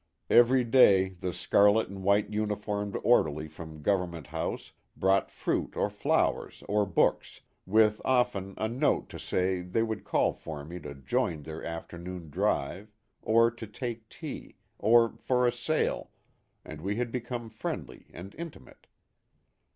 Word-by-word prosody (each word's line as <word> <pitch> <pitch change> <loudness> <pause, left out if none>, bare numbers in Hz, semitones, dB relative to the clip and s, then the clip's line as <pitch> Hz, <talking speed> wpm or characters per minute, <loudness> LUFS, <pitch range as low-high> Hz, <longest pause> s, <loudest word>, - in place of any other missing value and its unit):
Every 125 +2 +6
day 100 -6 +5
the 90 -1 -5
scarlet 100 +5 +3
and 95 0 -8
white 100 +2 +2
uniformed 105 -1 -2
orderly 80 -10 +3
from 80 0 -10
Government 90 -5 0
House - - -4 0.3
brought 95 0 +2
fruit - - -2
or - - +1
flowers - - 0
or 105 0 +1
books, - - +1 0.3
with 105 +1 +4
often 120 -7 +1
a 110 - 0
note 130 +6 0
to - - -8
say 90 0 0
they 90 +6 0
would 110 -2 -3
call - - +1
for 75 -3 -8
me 85 +3 -7
to 75 -3 -8
join 75 +3 -1
their 80 +2 -7
afternoon 85 0 -7
drive, 90 +10 -1 0.3
or 115 +1 +4
to 115 -1 -9
take 115 0 -6
tea, - - -8 0.2
or 115 +2 +4
for 125 -1 +1
a 120 - +4
sail, 155 +6 -1 0.6
and 75 0 -9
we 100 +4 -2
had 120 0 -2
become 120 -1 -4
friendly - - -6
and 95 +4 -10
intimate. 170 -2 -10
100 Hz, 145 wpm, -29 LUFS, 90-115 Hz, 0.6 s, Every